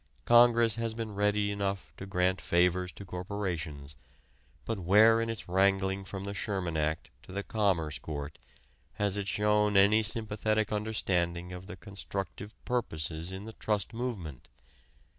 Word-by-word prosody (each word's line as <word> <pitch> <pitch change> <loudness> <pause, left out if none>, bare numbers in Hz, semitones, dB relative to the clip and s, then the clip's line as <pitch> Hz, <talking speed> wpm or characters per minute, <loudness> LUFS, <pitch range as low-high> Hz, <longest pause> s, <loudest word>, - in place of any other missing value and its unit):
Congress 120 -2 +6
has 115 -1 -2
been 110 -2 -4
ready 105 0 +1
enough 100 -1 -3
to 95 - -8
grant 90 0 +1
favors 90 +1 +2
to 100 - -10
corporations, 90 -7 -4 0.7
but 115 -3 -2
where 110 +5 +6
in 115 - -1
its 115 -2 -5
wrangling 95 +1 +2
from 95 0 -6
the 100 0 -4
Sherman 95 -5 -2
Act 80 0 -1
to - - -14
the 100 +2 -3
Commerce 90 -9 0
Court 75 -1 -6 0.5
has 100 -1 0
it 100 -1 -2
shown 105 0 +2
any 105 +3 +6
sympathetic 110 0 -1
understanding 90 -5 -1
of 90 +1 -8
the - - -7
constructive 100 +1 -6
purposes 80 -8 -2
in 95 +2 -6
the 110 - -8
trust 105 -2 -2
movement? 100 - -5
100 Hz, 145 wpm, -30 LUFS, 90-105 Hz, 0.7 s, Congress